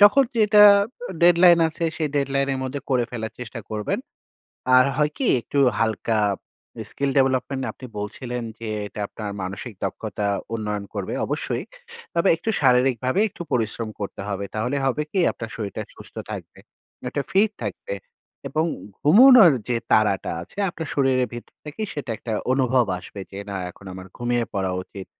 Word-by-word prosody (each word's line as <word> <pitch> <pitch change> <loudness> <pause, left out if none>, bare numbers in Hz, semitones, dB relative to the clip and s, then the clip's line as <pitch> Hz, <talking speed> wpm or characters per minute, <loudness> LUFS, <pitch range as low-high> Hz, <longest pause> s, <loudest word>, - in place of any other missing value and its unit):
যখন 210 +7 +7
যেটা 210 -1 +6 0.5
আ - - -10
ডেডলাইন 175 0 +7
আছে 165 +1 -4
সেই 155 -2 -1
ডেডলাইনের 140 -1 0
মধ্যে 135 +2 -4
করে 125 -2 +3
ফেলার 110 -2 -5
চেষ্টা 125 -3 -7
করবেন। 105 -1 -2 0.8
আর 130 - +7
হয় 150 0 +2
কি 270 - -1
একটু 130 +5 -4 0.2
হালকা 110 0 0 0.7
skill 140 -1 -1
development 135 0 +1
আপনি 130 - -10
বলছিলেন 120 +4 -4 0.2
যে 115 - -6 0.2
এটা 105 - -8
আপনার 105 -2 -6
মানসিক 100 +5 -6
দক্ষতা 105 - -3 0.3
উন্নয়ন 105 -2 -3
করবে, - - -3
অবশ্যই। - - -2 0.5
তবে 170 +3 +3
একটু 225 - -2
শারীরিকভাবে 130 - +3
একটু 185 - -8
পরিশ্রম 115 -1 -1
করতে 100 - -5
হবে। 100 -1 -3
তাহলে 120 +6 -1
হবে 135 +3 +1
কি, 195 - +2
আপনার 115 -1 -7
শরীরটা 105 -3 -4
সুস্থ - - -13 0.2
থাকবে, - - -7 0.5
একটা 140 +2 -2
ফিট 205 +3 +4
থাকবে - - -4 0.5
এবং 155 +1 0 0.4
ঘুমোনোর 220 - +8 0.2
যে 120 - +1 0.2
তাড়াটা 105 -3 +3
আছে 90 - -15
আপনার 160 -3 -6
শরীরের 130 -3 +2
ভেতর 120 0 -9
থেকেই 175 +8 -5
সেটা 135 -5 -5
একটা 115 - -5 0.2
অনুভব 130 -2 +3
আসবে 100 - -10
যে, 100 - -8
"না 100 - -3
এখন 100 +2 -16
আমার 95 0 -9
ঘুমিয়ে 120 -1 0
পড়া 95 -2 0
উচিত।" 95 +1 -10
130 Hz, 155 wpm, -23 LUFS, 110-150 Hz, 0.8 s, ঘুমোনোর